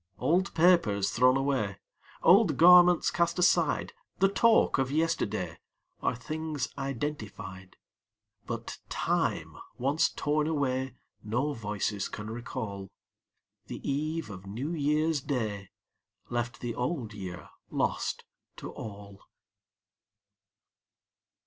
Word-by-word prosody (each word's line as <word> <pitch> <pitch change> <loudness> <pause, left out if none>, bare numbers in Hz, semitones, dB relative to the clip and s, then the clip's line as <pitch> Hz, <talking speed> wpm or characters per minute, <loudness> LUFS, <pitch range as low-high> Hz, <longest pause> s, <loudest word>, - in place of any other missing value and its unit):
Old 185 +4 +1
papers 160 - +4
thrown 130 +2 +4
away, 130 -8 0 0.5
Old 190 +1 +6
garments 180 0 +7
cast 170 +1 +1
aside, 180 - +2 0.2
The 195 - +4
talk 225 - +4
of 135 -1 +1
yesterday, 165 +4 -1 0.4
Are - - 0
things 155 +2 -3
identified; 115 -9 -5 0.7
But - - -5
time - - -1 0.2
once 140 +5 +2
torn 150 +1 0
away 130 -4 -1 0.3
No 125 +8 -1
voices 105 -3 -2
can 105 +1 -6
recall: 105 -4 -5 0.8
The - - -7
eve 155 0 -2
of 95 0 -10
New 125 +11 -4
Year's 150 0 +1
Day 110 -9 -3 0.6
Left 120 0 -2
the 120 -1 -3
Old 125 -2 -3
Year 90 -3 -7 0.2
lost - - -1 0.3
to - - -7
all. 100 -2 -9
135 Hz, 105 wpm, -29 LUFS, 105-160 Hz, 0.8 s, garments